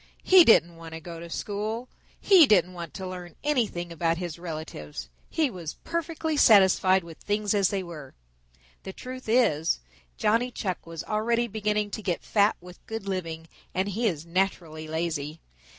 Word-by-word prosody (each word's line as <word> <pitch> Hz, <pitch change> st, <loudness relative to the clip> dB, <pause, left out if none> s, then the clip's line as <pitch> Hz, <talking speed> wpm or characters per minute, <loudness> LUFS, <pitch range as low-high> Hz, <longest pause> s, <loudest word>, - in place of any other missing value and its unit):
He 370 Hz, -2 st, +8 dB
didn't 175 Hz, -, +5 dB
want 165 Hz, -1 st, -9 dB
to -, -, -6 dB
go 165 Hz, 0 st, -8 dB
to 170 Hz, 0 st, -9 dB
school. 215 Hz, +6 st, -3 dB, 0.3 s
He 365 Hz, -7 st, +7 dB
didn't 185 Hz, -4 st, +4 dB
want 170 Hz, -2 st, -8 dB
to 190 Hz, -, -5 dB
learn 180 Hz, -2 st, -8 dB
anything 225 Hz, -12 st, 0 dB
about 165 Hz, 0 st, 0 dB
his 175 Hz, -2 st, -5 dB
relatives. 155 Hz, -, -7 dB, 0.2 s
He 305 Hz, -5 st, +1 dB
was 170 Hz, -5 st, -6 dB
perfectly 330 Hz, -1 st, -2 dB
satisfied 190 Hz, -5 st, +6 dB
with 165 Hz, -1 st, -12 dB
things 205 Hz, +1 st, 0 dB
as 200 Hz, -3 st, +3 dB
they 195 Hz, -2 st, -2 dB
were. 155 Hz, -6 st, -10 dB, 0.7 s
The 190 Hz, -, -8 dB
truth 255 Hz, 0 st, -8 dB
is, 190 Hz, -10 st, +3 dB, 0.4 s
Johnny 230 Hz, +4 st, +2 dB
Chuck 185 Hz, -8 st, -4 dB
was 165 Hz, -1 st, -6 dB
already 230 Hz, +2 st, 0 dB
beginning 210 Hz, -1 st, -1 dB
to 215 Hz, -, -4 dB
get 180 Hz, -5 st, -2 dB
fat 205 Hz, 0 st, +3 dB
with 180 Hz, 0 st, -14 dB
good 225 Hz, -2 st, -5 dB
living 165 Hz, -4 st, -4 dB, 0.3 s
and 190 Hz, +2 st, 0 dB
he 225 Hz, +4 st, 0 dB
is 165 Hz, -5 st, -2 dB
naturally 170 Hz, -3 st, -2 dB
lazy. 160 Hz, -1 st, -3 dB
185 Hz, 165 wpm, -27 LUFS, 165-220 Hz, 0.7 s, He